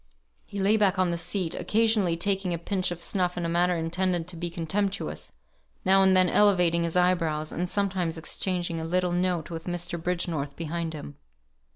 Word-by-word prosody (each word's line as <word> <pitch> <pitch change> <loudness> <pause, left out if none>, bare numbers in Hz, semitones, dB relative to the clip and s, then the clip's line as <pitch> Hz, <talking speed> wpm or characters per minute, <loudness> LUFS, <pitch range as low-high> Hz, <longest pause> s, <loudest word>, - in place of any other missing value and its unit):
He 200 - -6
lay 200 +3 +3
back 200 -3 +2
on 185 -2 +2
the - - 0
seat, 175 0 -1
occasionally 215 -6 +1
taking 190 -1 +1
a - - -3
pinch 185 +2 -1
of 175 -1 -6
snuff 180 -3 0
in 175 - -2
a - - 0
manner 175 +1 +2
intended 175 +1 -1
to 180 - -3
be 170 +1 -3
contemptuous; 190 +5 -3 0.5
now 195 +1 +5
and 190 -1 +5
then 185 0 +5
elevating 180 -4 +4
his 170 0 -1
eyebrows, 165 -4 +1
and 175 +1 -2
sometimes 185 -5 0
exchanging 175 0 -2
a - - -4
little 180 +2 0
note 175 -2 -1
with 165 +1 -6
Mr. 175 -1 -3
Bridgenorth 165 -5 -2
behind 165 0 -4
him. 145 -1 -8
175 Hz, 185 wpm, -27 LUFS, 165-190 Hz, 0.5 s, now